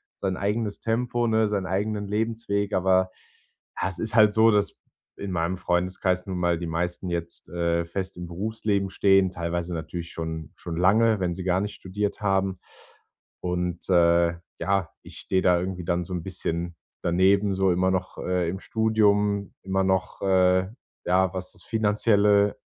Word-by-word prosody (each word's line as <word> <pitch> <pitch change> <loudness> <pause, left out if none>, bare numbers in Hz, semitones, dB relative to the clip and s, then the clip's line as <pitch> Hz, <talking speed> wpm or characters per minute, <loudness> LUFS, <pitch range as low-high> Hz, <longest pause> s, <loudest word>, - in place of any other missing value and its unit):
sein 95 -2 -2
eigenes 105 +1 -1
Tempo, 120 +1 0
ne, 110 -1 +3
seinen 100 -3 -1
eigenen 105 +2 -1
Lebensweg. 105 -1 -1
Aber, 95 0 +3 0.7
ha, - - 0
es 95 -2 -8
ist 110 +1 -3
halt 105 -2 +6
so, 110 +1 +5
dass 105 -2 +2 0.4
in 100 -2 -5
meinem 85 +1 -1
Freundeskreis 90 0 0
nun 95 -2 -4
mal 85 -1 +1
die 85 - -5
meisten 85 +2 -3
jetzt, 85 -2 -4
äh, 85 0 0
fest 95 +3 -5
im 90 0 -6
Berufsleben 100 +2 -1
stehen, 95 -1 +4
teilweise 85 0 -3
natürlich 85 +1 -5
schon 80 -2 -5
schon 85 -2 -6
lange, 110 +4 +4
wenn 90 -2 -1
sie 90 - -6
gar 90 0 +1
nicht 105 +1 -4
studiert 105 +2 -3
haben. 95 -2 0 0.8
Und, 90 -1 -2
äh, 85 -1 +4 0.3
ja, 95 -3 0
ich - - -12
stehe 95 - 0
da 90 -1 +4
irgendwie 90 0 -4
dann 85 +1 0
so 90 - -6
'n 85 -2 -3
bisschen 85 -2 -4 0.3
daneben, 95 +3 +3
so 95 -1 +2
immer 95 +1 +2
noch, 95 0 -2
äh, 90 -2 0
im 95 - -3
Studium. 105 -3 +1
Immer 95 0 0
noch, 95 -1 -1
äh, 95 -1 +3 0.4
ja, 95 +1 +2
was 90 0 -5
das 85 - -11
Finanzielle 105 -2 +3
95 Hz, 165 wpm, -25 LUFS, 90-100 Hz, 0.8 s, halt